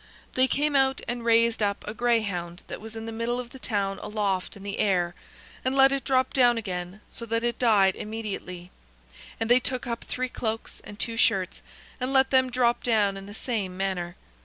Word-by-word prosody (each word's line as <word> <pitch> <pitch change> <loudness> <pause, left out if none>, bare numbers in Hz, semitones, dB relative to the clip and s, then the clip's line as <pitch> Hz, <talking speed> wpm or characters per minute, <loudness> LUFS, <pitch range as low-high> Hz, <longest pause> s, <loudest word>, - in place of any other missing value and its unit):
They 260 0 +4
came 290 +2 +1
out 270 -1 +3
and 240 0 -3
raised 230 0 +4
up 200 -1 0
a 210 - -3
greyhound 205 -7 0
that - - -7
was 220 +1 -9
in 225 0 -5
the 225 - -5
middle 230 +2 -1
of 245 -1 -7
the 265 - -11
town 200 -5 -1
aloft 200 -3 -2
in 200 - -12
the 200 0 -4
air, 180 -4 +2 0.5
and 260 +1 0
let 270 0 +7
it 275 -1 -1
drop 260 -1 +2
down 245 -3 +5
again, 185 -2 -4
so - - -8
that 230 +1 0
it 240 -1 -1
died 205 -6 +4
immediately; 200 -5 -6 0.7
and 225 - 0
they 245 +2 +6
took 255 0 -2
up 235 -1 -4
three 255 0 -2
cloaks 225 -2 -4
and 205 - -9
two 230 +1 -2
shirts, 190 -5 +2 0.4
and 255 +1 -1
let 265 -1 +4
them 260 -1 +4
drop 240 -1 +2
down 210 -4 +2
in 195 0 -8
the 205 - -9
same 205 -7 -3
manner. 185 -2 -2
225 Hz, 205 wpm, -27 LUFS, 195-245 Hz, 0.7 s, let